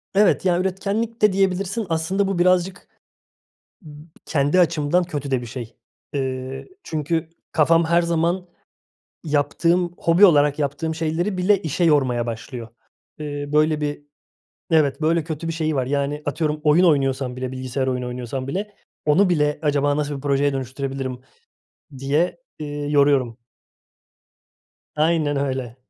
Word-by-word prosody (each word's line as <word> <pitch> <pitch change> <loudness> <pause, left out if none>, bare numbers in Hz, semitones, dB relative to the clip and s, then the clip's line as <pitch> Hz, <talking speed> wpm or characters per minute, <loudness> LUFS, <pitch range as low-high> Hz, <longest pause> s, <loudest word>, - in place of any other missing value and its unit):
Evet. 200 -1 +3
Ya, 175 -1 +3
üretkenlik 200 +5 -2
de 210 -3 +5
diyebilirsin. 195 +2 0
Aslında 175 +5 0
bu 195 -2 -1
birazcık 180 0 +2 0.9
b 150 -2 -12 0.2
kendi 145 +4 +2
açımdan 165 +1 +2
kötü 145 -5 -5
de 130 - +1
bir 120 - -7
şey. 120 -1 -8 0.4
Eee, 130 -1 -4 0.2
çünkü 160 +1 -2 0.2
kafam 165 +1 +4
her 170 +1 +3
zaman 170 +2 0 0.8
yaptığım, 165 +4 +1
hobi 170 +5 +5
olarak 145 -4 +5
yaptığım 150 +3 -2
şeyleri 165 +5 -1
bile 195 +2 +3
işe 165 +3 -1
yormaya 130 -7 +2
başlıyor. 115 +1 -6 0.5
Eee, 145 -1 -5
böyle 155 0 +3
bir 145 0 -4 0.6
Evet, 145 -3 +3
böyle 165 0 +1
kötü 160 0 -5
bir - - -1
şeyi 155 -2 -1
var. 130 -2 0
Yani, 145 +2 -1
atıyorum, 150 +1 -1
oyun 155 +4 +5
oynuyorsam 135 -5 +1
bile, 130 0 -4
bilgisayar 130 +1 -3
oyunu 125 -1 -2
oynuyorsam 125 +1 -5
bile, 205 +7 -4 0.3
onu 185 +7 +4
bile 150 -4 +1
acaba 145 -1 +1
nasıl 145 -1 -2
bir 135 - -8
projeye 140 0 +1
dönüştürebilirim 135 -1 -4 0.8
diye, 145 - 0 0.2
eee, 150 - -5 0.2
yoruyorum. 140 -5 +2 1.6
Aynen 155 -2 +1
öyle. 130 -4 -2
150 Hz, 135 wpm, -22 LUFS, 135-170 Hz, 1.6 s, de